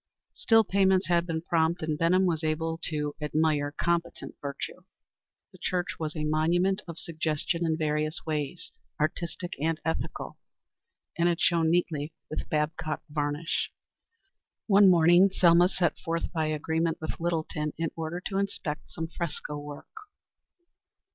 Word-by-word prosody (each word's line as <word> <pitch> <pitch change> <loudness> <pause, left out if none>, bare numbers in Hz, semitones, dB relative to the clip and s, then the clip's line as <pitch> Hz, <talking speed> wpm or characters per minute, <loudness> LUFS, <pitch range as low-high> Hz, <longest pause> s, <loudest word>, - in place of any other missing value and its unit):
Still, 225 -1 +4
payments 190 -2 +2
had 170 0 +2
been 160 -1 -2
prompt, 165 0 +1
and 155 -1 0
Benham 175 +4 +3
was 165 -3 0
able 160 +1 -1
to 150 -2 -2
admire 150 -1 +1
competent 170 +2 -2
virtue. 140 -1 -5 0.7
The - - -17
church 180 -1 -2
was 155 -1 -3
a 155 - -2
monument 170 +5 +2
of 170 -1 -7
suggestion 160 +1 -1
in 160 -1 +1
various 155 +1 -1
ways, 155 +1 -3 0.3
artistic 170 +3 -2
and 160 0 0
ethical, 160 - -3 0.8
and 170 +1 +4
it 170 - 0
shone 165 -2 +3
neatly 160 -3 0 0.2
with 155 - -4
Babcock 155 0 -1
varnish. 150 +2 -1 1.0
One 200 -2 +7
morning 175 +2 +6
Selma 175 -1 +5
set 180 -2 0
forth 165 0 -2
by 160 -2 0
agreement 160 +2 0
with 160 - -5
Littleton, 160 -3 -1
in 165 0 -1
order 165 +2 -3
to 195 -1 -1
inspect 175 -6 -3
some 165 -1 -4
fresco 160 -3 -4
work. 145 0 -8
165 Hz, 140 wpm, -28 LUFS, 155-175 Hz, 1.0 s, One